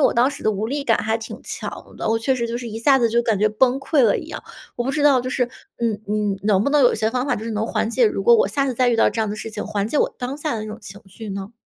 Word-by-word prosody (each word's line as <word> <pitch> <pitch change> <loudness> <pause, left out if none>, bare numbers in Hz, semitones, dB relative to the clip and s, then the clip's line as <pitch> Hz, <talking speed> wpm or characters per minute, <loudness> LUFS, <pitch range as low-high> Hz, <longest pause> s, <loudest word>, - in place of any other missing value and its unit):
我 - - +1
当 245 +4 +3
时 280 - -9
的 215 - +2
无 210 +2 -2
力 280 +3 -2
感 225 - +3
还 220 +1 0
挺 225 - -8
强 - - -7
的， - - -2
我 225 0 +2
确 260 +3 +1
实 235 -2 -2
就 235 - -3
是 240 -1 -6
一 220 +1 -6
下 270 +3 +4
子 235 -2 +2
就 235 +1 +2
感 220 -4 +1
觉 215 +2 +3
崩 250 +5 +2
溃 275 +1 +2
了 220 -4 +4
一 - - -8
样。 - - -7 0.3
我 240 - -2
不 270 - 0
知 300 +1 -1
道 280 -4 +5
就 255 - -4
是， 250 -1 +1 0.3
嗯 225 -3 -1
你 210 -1 -1
能 205 -1 +3
不 280 - +1
能 295 -1 +4
有 250 - +5
一 - - -2
些 220 +1 0
方 250 +1 -1
法 290 - 0
就 215 - -6
是 230 - -4
能 220 +1 -1
缓 225 - -1
解 465 - +3
如 - - -1
果 475 0 +6
我 455 - +2
下 275 -1 0
次 260 - -1
再 250 +1 +2
遇 235 - +2
到 - - +4
这 225 - -3
样 215 - 0
的 210 - -4
事 225 - -6
情， 210 -1 -5
缓 200 0 -1
解 295 - 0
我 - - +1
当 250 +3 -4
下 300 -3 -2
的 220 - -3
那 - - -6
种 215 +1 -7
情 200 +1 -11
绪 215 +3 -9
呢？ 195 +2 -6
235 Hz, 370 characters per minute, -21 LUFS, 215-265 Hz, 0.3 s, 果